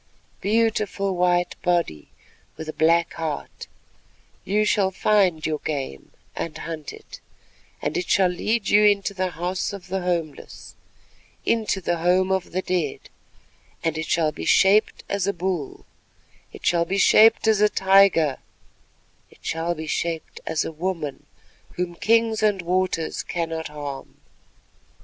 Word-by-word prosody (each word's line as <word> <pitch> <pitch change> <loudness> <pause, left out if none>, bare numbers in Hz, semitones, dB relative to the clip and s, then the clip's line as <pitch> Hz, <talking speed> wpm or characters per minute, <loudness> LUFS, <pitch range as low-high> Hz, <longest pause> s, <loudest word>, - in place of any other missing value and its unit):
Beautiful 210 -2 0
white 175 0 +2
body 170 - 0 0.5
with 155 0 -6
black 170 +1 +3
heart, 160 -3 -5 0.8
you 210 +2 +1
shall 200 -2 +2
find 190 -4 +2
your 155 -1 -1
game 135 - -5 0.3
and 165 - -4
hunt 160 -3 -6
it, - - -12 0.6
and 150 - -2
it 180 - -2
shall 190 -2 +4
lead 210 +5 -1
you 210 +1 +5
into 200 -1 +3
the 185 -1 -1
House 180 +4 -3
of 190 -2 -9
the 190 +1 -2
Homeless, 170 -4 -4 0.7
into 220 -4 +1
the 175 0 -1
Home 180 +3 +2
of 190 -2 -1
the 185 +2 -2
Dead, 175 -6 -2 0.7
and 160 -2 0
it 160 0 -4
shall 160 -2 +1
be 80 - -8
shaped 200 - +3
as 200 -1 -1
a 200 - +1
bull, 175 -5 -4 0.7
it - - -11
shall 170 -1 +3
be 190 +4 -2
shaped 220 +2 +5
as 215 -2 +3
a 210 - +5
tiger, 190 -8 +4 0.9
it - - -22
shall 165 +1 -1
be 160 0 -6
shaped 165 0 -3
as 160 -1 0
a - - -4
woman 160 -3 -4 0.5
whom 180 -1 -2
kings 225 +4 +2
and 205 -4 +1
waters 180 -2 -1
cannot 165 -2 -3
harm. 145 -2 -8
180 Hz, 140 wpm, -23 LUFS, 160-195 Hz, 0.9 s, you